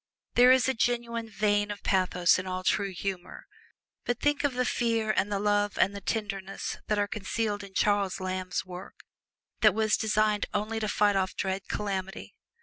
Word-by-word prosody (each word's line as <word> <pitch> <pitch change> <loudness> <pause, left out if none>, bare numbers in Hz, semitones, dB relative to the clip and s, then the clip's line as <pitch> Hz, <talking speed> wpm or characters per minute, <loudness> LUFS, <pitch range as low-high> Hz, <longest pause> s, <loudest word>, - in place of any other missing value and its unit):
There 250 +1 +7
is 260 -1 +4
a 265 - +2
genuine 235 -1 -1
vein 205 0 +1
of 205 -1 -6
pathos 185 -2 +3
in 185 - -5
all 185 0 -3
true 200 +1 +1
humor, 185 -1 -5 0.6
but 245 -1 -2
think 290 0 +1
of 285 -3 0
the 250 0 +1
fear 230 -3 +1
and 205 -1 0
the 200 - +1
love 205 0 +1
and 200 +1 +2
the 200 - -6
tenderness 195 -2 -3
that 210 - +1
are 205 0 +1
concealed 210 0 -2
in 195 -1 -12
Charles 205 -2 +1
Lamb's 185 -1 -3
work 180 +1 -9 0.6
that 215 -3 +5
was 220 -1 +2
designed 215 -1 +1
only 215 +2 -1
to 215 - -2
fight 205 -1 +2
off 190 -1 0
dread 190 0 -3
calamity! 195 -1 -4
205 Hz, 180 wpm, -28 LUFS, 195-220 Hz, 0.6 s, There